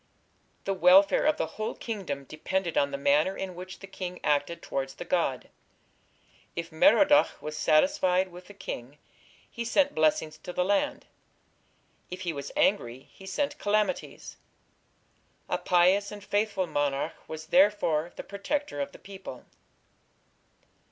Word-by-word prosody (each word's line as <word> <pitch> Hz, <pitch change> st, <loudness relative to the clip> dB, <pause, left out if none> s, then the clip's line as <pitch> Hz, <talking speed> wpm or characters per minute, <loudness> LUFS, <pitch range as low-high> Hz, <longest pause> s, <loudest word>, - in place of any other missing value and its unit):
The 195 Hz, -, 0 dB
welfare 190 Hz, -, +5 dB
of 305 Hz, -, +3 dB
the -, -, 0 dB
whole 215 Hz, 0 st, -5 dB
kingdom 190 Hz, -, -5 dB
depended 170 Hz, +5 st, -3 dB
on 140 Hz, -, +3 dB
the 140 Hz, -, -4 dB
manner 150 Hz, +7 st, +2 dB
in 190 Hz, -1 st, -4 dB
which 185 Hz, +1 st, -9 dB
the -, -, -7 dB
king 185 Hz, -2 st, -6 dB
acted 150 Hz, +3 st, +1 dB
towards 135 Hz, 0 st, -3 dB
the -, -, -7 dB
god. 150 Hz, -8 st, -1 dB, 1.0 s
If 170 Hz, 0 st, -4 dB
Merodach 290 Hz, -, +5 dB
was 150 Hz, 0 st, -6 dB
satisfied 185 Hz, -, +3 dB
with 180 Hz, +1 st, -12 dB
the 205 Hz, -, -13 dB
king 130 Hz, -6 st, -7 dB, 0.5 s
he 235 Hz, -, -5 dB
sent 280 Hz, +5 st, +2 dB
blessings 155 Hz, 0 st, +1 dB
to 180 Hz, -, -7 dB
the 180 Hz, -, 0 dB
land; 200 Hz, +1 st, 0 dB, 1.0 s
if 180 Hz, +1 st, -7 dB
he 175 Hz, -3 st, -2 dB
was 140 Hz, -1 st, -6 dB
angry 130 Hz, -, +1 dB
he 190 Hz, -, -13 dB
sent 280 Hz, +9 st, -2 dB
calamities. 210 Hz, +5 st, -1 dB, 1.1 s
A -, -, -1 dB
pious 185 Hz, +3 st, +3 dB
and 205 Hz, -1 st, -9 dB
faithful 205 Hz, -2 st, 0 dB
monarch 145 Hz, -3 st, -1 dB
was 160 Hz, 0 st, -7 dB
therefore 175 Hz, -5 st, +3 dB
the -, -, -7 dB
protector 285 Hz, +9 st, -3 dB
of 280 Hz, 0 st, -4 dB
the -, -, -11 dB
people. 190 Hz, -10 st, -10 dB
180 Hz, 145 wpm, -28 LUFS, 155-205 Hz, 1.1 s, welfare